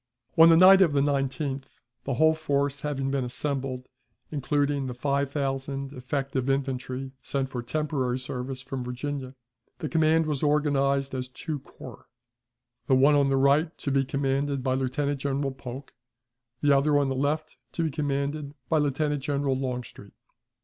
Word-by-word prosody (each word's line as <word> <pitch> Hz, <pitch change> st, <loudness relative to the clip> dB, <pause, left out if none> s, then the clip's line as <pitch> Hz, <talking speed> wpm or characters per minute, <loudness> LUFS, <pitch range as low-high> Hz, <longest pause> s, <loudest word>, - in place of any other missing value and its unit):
On 165 Hz, +1 st, +8 dB
the 165 Hz, -, +7 dB
night 190 Hz, +2 st, +8 dB
of 165 Hz, -6 st, +4 dB
the 140 Hz, -, +3 dB
19th, 140 Hz, 0 st, -1 dB, 0.4 s
the 135 Hz, -, -1 dB
whole 160 Hz, +5 st, +5 dB
force 140 Hz, -3 st, -1 dB
having 135 Hz, -2 st, -2 dB
been 135 Hz, -2 st, 0 dB
assembled, 130 Hz, 0 st, -3 dB, 0.5 s
including 145 Hz, -1 st, 0 dB
the 125 Hz, -, -5 dB
five 140 Hz, +2 st, 0 dB
thousand 135 Hz, -1 st, -3 dB
effective 135 Hz, 0 st, -2 dB
infantry 135 Hz, -1 st, -2 dB
sent 135 Hz, -1 st, -2 dB
for 125 Hz, -, -3 dB
temporary 135 Hz, -2 st, -1 dB
service 130 Hz, +1 st, -5 dB
from 135 Hz, -1 st, -5 dB
Virginia, 130 Hz, +2 st, -5 dB, 0.4 s
the 155 Hz, -, -4 dB
command 160 Hz, 0 st, +3 dB
was 150 Hz, -3 st, -2 dB
organized 140 Hz, -2 st, +1 dB
as 130 Hz, -1 st, -3 dB
two 150 Hz, +3 st, -5 dB
corps, 135 Hz, -, -13 dB, 0.8 s
the 130 Hz, -, +4 dB
one 140 Hz, +3 st, +5 dB
on 140 Hz, -1 st, +3 dB
the 135 Hz, -, +2 dB
right 145 Hz, +5 st, +3 dB
to 140 Hz, -, -3 dB
be 135 Hz, 0 st, +3 dB
commanded 140 Hz, 0 st, -1 dB
by 130 Hz, -1 st, +1 dB
Lieutenant 135 Hz, +2 st, -1 dB
General 140 Hz, 0 st, -1 dB
Polk; 130 Hz, +1 st, -9 dB, 0.7 s
the 145 Hz, -1 st, +5 dB
other, 145 Hz, +2 st, +3 dB
on 140 Hz, -1 st, +2 dB
the 135 Hz, -, -1 dB
left, 150 Hz, +3 st, -1 dB, 0.2 s
to 165 Hz, -, -1 dB
be 160 Hz, -, 0 dB
commanded 145 Hz, 0 st, -2 dB
by 160 Hz, -, +3 dB
Lieutenant 145 Hz, 0 st, 0 dB
General 140 Hz, -1 st, 0 dB
Longstreet. 125 Hz, -2 st, -5 dB
140 Hz, 160 wpm, -27 LUFS, 135-145 Hz, 0.8 s, On